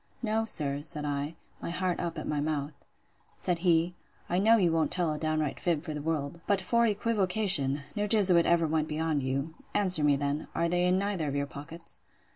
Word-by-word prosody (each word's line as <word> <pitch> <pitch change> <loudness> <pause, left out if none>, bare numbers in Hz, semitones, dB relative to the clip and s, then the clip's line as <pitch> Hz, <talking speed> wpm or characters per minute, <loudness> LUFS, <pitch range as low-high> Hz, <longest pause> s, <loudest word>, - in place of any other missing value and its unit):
No, 220 0 0
sir, 145 -9 -1
said 150 -1 -4
I; 145 +2 -3 0.3
my - - -5
heart 180 +1 -2
up 170 -1 -4
at - - -5
my 150 - -1
mouth. 145 -1 -2 0.7
Said 175 -2 -1
he, 170 0 +2 0.3
I 175 - 0
know 225 +3 +5
you 180 -5 +2
won't 160 -1 +1
tell 175 -4 0
a 150 - -5
downright 155 -2 -2
fib 165 -4 -1
for 155 - -5
the 150 - -5
world: 155 0 -3
but 200 -2 +2
for 235 +5 +1
equivocation! 195 -9 +4
no 210 0 -1
jesuit 190 -6 +5
ever 170 -1 +3
went 155 0 -1
beyond 155 -1 -1
you. 135 +4 -3 0.2
Answer 185 -6 +5
me 145 -1 +4
then, 145 +2 -3
Are 170 +1 +1
they 175 +1 +1
in 180 +1 +2
neither 195 -5 -2
of 140 - -3
your 140 0 -1
pockets? 165 +4 -7
165 Hz, 205 wpm, -28 LUFS, 150-185 Hz, 0.7 s, know